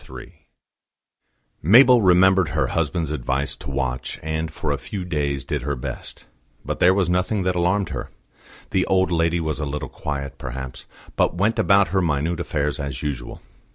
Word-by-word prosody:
III - - -10 1.3
Mabel 120 - +7
remembered 95 -2 +5
her 75 +1 0
husband's 80 -1 -1
advice 70 -1 -2
to 70 - -9
watch, 65 -2 -3
and 80 0 -2
for 80 -1 -3
a 70 - -1
few 95 -3 -6
days 70 -6 -2
did - - -2
her 70 +2 -2
best. 65 0 -7 0.4
But - - -3
there 90 +2 +5
was 95 -3 +2
nothing 90 +3 0
that 90 0 0
alarmed 90 +2 +1
her. 65 -6 -5 0.6
The - - +1
old 95 -1 +2
lady 85 0 +1
was 80 -3 -2
a 75 - -2
little 75 +2 -4
quiet, 70 -3 -5
perhaps, 65 +1 -7 0.3
but - - +1
went 105 +5 +1
about 100 -1 +4
her 95 +1 +1
minute 80 0 0
affairs 75 -2 -2
as 70 -2 -5
usual. 65 -5 -5
80 Hz, 170 wpm, -22 LUFS, 70-90 Hz, 1.3 s, Mabel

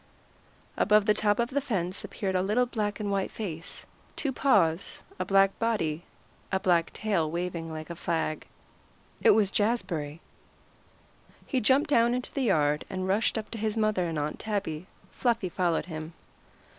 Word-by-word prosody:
Above 210 -1 +4
the 210 - +5
top 210 -1 +2
of 235 +2 0
the 285 +2 +1
fence 190 -8 -2
appeared 195 -3 -3
a 185 - +2
little 215 +6 +2
black 210 -4 -2
and 205 -1 -2
white 195 -1 0
face, 170 -6 -5 0.3
two 285 - -1
white 265 - -4
paws, 190 - +2 0.2
a - - -1
black 195 0 +3
body, 175 -9 0 0.5
a 190 - +2
black 175 -3 +2
tail 195 -8 0
waving 170 -1 -3
like 155 +1 -6
a - - -5
flag. 160 -2 -2 0.7
It - - +5
was 200 -2 +5
Jazbury. 185 -9 -1 1.3
He 260 - 0
jumped 275 +7 +3
down 235 -1 +4
into 250 - -5
the 275 - -1
yard, 150 - +2
and 185 0 -3
rushed 205 +4 +2
up 215 - -5
to 225 - -5
his 215 +1 -1
mother 215 -4 +2
and 165 -2 -3
Aunt 150 +1 -2
Tabby. 190 -6 -3 0.2
Fluffy 230 -6 0
followed 175 -2 0
him. 160 -1 -7
195 Hz, 170 wpm, -28 LUFS, 165-220 Hz, 1.3 s, the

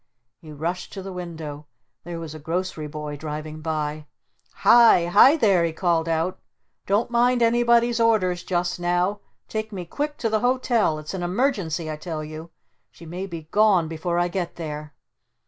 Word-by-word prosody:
He 155 - -12
rushed 165 +5 -4
to 195 - -6
the 195 0 -7
window. 160 -4 -7 0.4
There 170 -1 -5
was 160 -2 -7
a 155 - -8
grocery 165 0 -3
boy 150 0 -6
driving 155 +1 -6
by. 155 -1 -3 0.5
"Hi! 230 -7 +6
Hi 210 - +6
there!" 195 - +3
he 165 -1 -1
called 165 -2 0
out. 165 +3 -1 0.5
"Don't 210 +5 +1
mind 240 0 +3
anybody's 235 0 +3
orders 195 -6 +2
just 175 -1 -1
now! 175 +3 0 0.3
Take 220 0 -4
me 185 -4 -5
quick 295 - -3
to 230 - -1
the 220 -1 +1
Hotel! 245 -8 +1
It's 155 +3 -7
an 190 - -4
Emergency 175 - -1
I 155 - -5
tell 155 -1 -5
you! 155 +2 -8 0.4
She 170 - -15
may 180 +4 -5
be 165 -3 -7
gone 205 -6 +4
before 165 +2 -2
I 175 0 +2
get 175 -1 -4
there!" 150 -3 -6
175 Hz, 170 wpm, -24 LUFS, 160-210 Hz, 0.5 s, Hi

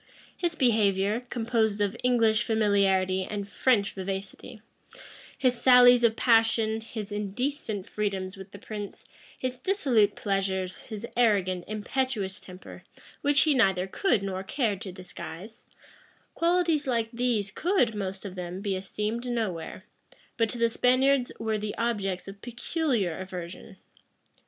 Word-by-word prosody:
His 345 -2 -1
behavior, 210 -5 +2
composed 225 -3 -1
of 205 -1 0
English 225 -3 +3
familiarity 195 -4 +2
and 200 +1 -5
French 205 -2 +1
vivacity; 195 +4 -6 0.8
his 250 -3 +1
sallies 245 -1 +7
of 225 -1 +4
passion, 225 -2 +3
his 220 -2 -7
indecent 210 +1 -3
freedoms 195 -3 -3
with 190 0 -10
the 200 - -11
prince, 205 0 -7 0.3
his 255 -1 -4
dissolute 255 - +2
pleasures, 190 -2 -2
his 215 0 -6
arrogant, 195 -7 +2
impetuous 215 -2 -2
temper, 185 0 -11 0.4
which 285 -1 +4
he 310 - +4
neither 195 -8 +3
could 210 - +1
nor 190 -1 -3
cared 205 -1 -1
to 190 - -6
disguise; 185 +2 -10 0.7
qualities 335 -4 +1
like 230 -3 0
these 235 -4 0
could, 335 - +1
most 195 -1 -4
of 195 - -6
them, 180 0 -5
be 200 -1 -2
esteemed 210 +5 -3
nowhere, 190 -8 -3 0.5
but 225 -2 +1
to 240 - -6
the 230 0 +2
Spaniards 255 +2 +3
were 220 -1 -1
the 210 0 -4
objects 200 -6 -1
of 195 0 -10
peculiar 245 - -1
aversion. 185 +1 -8
215 Hz, 130 wpm, -27 LUFS, 195-245 Hz, 0.8 s, sallies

